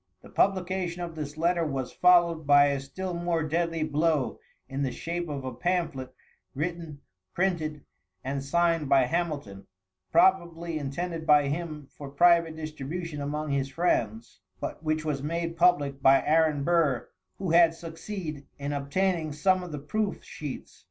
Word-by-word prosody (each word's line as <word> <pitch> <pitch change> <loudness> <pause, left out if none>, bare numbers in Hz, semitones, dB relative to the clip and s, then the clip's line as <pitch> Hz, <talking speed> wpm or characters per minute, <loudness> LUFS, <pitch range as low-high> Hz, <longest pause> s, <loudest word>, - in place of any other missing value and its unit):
The - - -13
publication 185 -2 0
of 170 -1 -5
this 150 -1 -6
letter 170 +1 +2
was 135 -5 -3
followed 170 -3 +4
by 145 0 +6
a 140 -1 -1
still 180 +7 -5
more 170 -1 -1
deadly 165 +1 -1
blow 155 -2 0 0.3
in 135 +1 -4
the 135 -2 0
shape 170 +3 -4
of 140 -3 -4
a 130 - -4
pamphlet, 135 -3 -2 0.4
written, 160 -1 -4 0.3
printed 160 -5 -1 0.4
and 135 +1 -3
signed 165 0 +1
by 135 -1 +6
Hamilton, 130 - -2 0.4
probably 170 -2 +2
intended 160 +3 -4
by 145 -2 +5
him 155 -2 -4
for 140 -2 -8
private 170 +2 +4
distribution 155 +1 -5
among 150 +1 -3
his 135 -1 0
friends, 115 -8 -1 0.2
but - - -5
which 155 0 -1
was 145 -3 -1
made 165 +3 -2
public 145 -6 +2
by 135 0 +5
Aaron 155 -2 +3
Burr, 155 -7 +2 0.3
who 190 -4 -2
had 165 -1 +6
succeed 165 -2 -7
in 140 +1 -3
obtaining 155 +3 0
some 185 +6 +2
of 180 -2 -7
the 150 - -4
proof 205 +9 -2
sheets. 150 -4 -8
155 Hz, 150 wpm, -27 LUFS, 140-170 Hz, 0.4 s, by